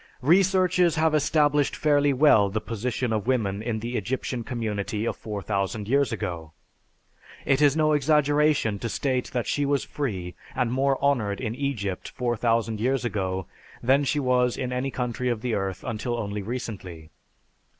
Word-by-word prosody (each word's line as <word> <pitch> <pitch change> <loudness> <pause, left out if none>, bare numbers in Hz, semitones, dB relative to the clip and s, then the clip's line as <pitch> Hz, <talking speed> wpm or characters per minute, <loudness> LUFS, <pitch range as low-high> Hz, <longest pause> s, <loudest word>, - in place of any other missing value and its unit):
Researches 180 +1 +4
have 160 0 +2
established 150 -1 +2
fairly 145 -1 +3
well 130 -7 +5
the 110 +3 -1
position 115 +2 -2
of 110 +1 -2
women 105 -6 0
in 110 -1 -3
the 120 +2 -4
Egyptian 125 +2 -3
community 110 -3 -3
of - - -1
4000 100 0 -3
years 140 0 +2
ago. 85 -8 -5 0.9
It 135 +1 +2
is 145 0 +4
no 155 -1 +3
exaggeration 150 -6 +2
to 115 - -3
state 130 -1 -1
that 120 -2 -3
she 145 - 0
was 140 -1 +1
free 95 -11 -4 0.2
and 125 -2 0
more 135 +1 +2
honored 110 -8 +1
in 115 -3 -3
Egypt 115 -8 -3
4000 115 -2 0
years 130 +2 0
ago, 95 -4 -2 0.4
than 135 +4 +4
she 145 +1 0
was 125 -2 +2
in 125 -1 -3
any 125 +2 -1
country 125 -1 -2
of 115 -3 -2
the 120 -1 -2
earth 95 -3 -2
until 120 +2 -3
only 105 -2 -3
recently. 95 -8 -6
125 Hz, 160 wpm, -25 LUFS, 105-140 Hz, 0.9 s, well